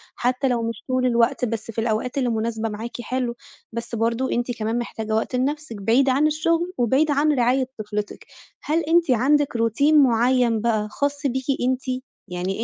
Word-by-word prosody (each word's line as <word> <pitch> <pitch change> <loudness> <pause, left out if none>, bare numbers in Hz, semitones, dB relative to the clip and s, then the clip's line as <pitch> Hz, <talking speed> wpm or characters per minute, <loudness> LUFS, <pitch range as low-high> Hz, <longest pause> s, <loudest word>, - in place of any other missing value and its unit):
حتى 255 +2 0
لو 240 -2 0
مش 230 -1 -4
طول 255 -1 +1
الوقت، 245 +2 +2
بس 230 -1 -4
في 225 - -3
الأوقات 230 +3 -1
اللي 255 -3 +1
مناسبة 225 0 -2
معاكِ 225 +3 -6
حلو، 250 -1 -2 0.4
بس 235 +1 -5
برضه 230 +3 0
أنتِ 240 +1 -1
كمان 225 +1 -1
محتاجة 220 -2 -3
وقت 220 +3 -1
لنفسِك 285 0 -2
بعيد 245 +7 +3
عن 275 +4 +3
الشغل 335 +3 0
وبعيد 265 +6 +2
عن 290 +2 +3
رعاية 255 0 +2
طفلتِك، 210 -1 -5 0.4
هل 310 +3 +1
أنتِ 330 -2 +3
عندِك 280 +4 +2
routine 230 +7 +2
معيّن 245 -4 +4
بقى 215 -2 0
خاص 285 +2 -2
بيكِ 260 0 -2 0.2
أنتِ؟ 255 0 -2 0.2
يعني 185 +4 -3
245 Hz, 170 wpm, -23 LUFS, 225-275 Hz, 0.4 s, معيّن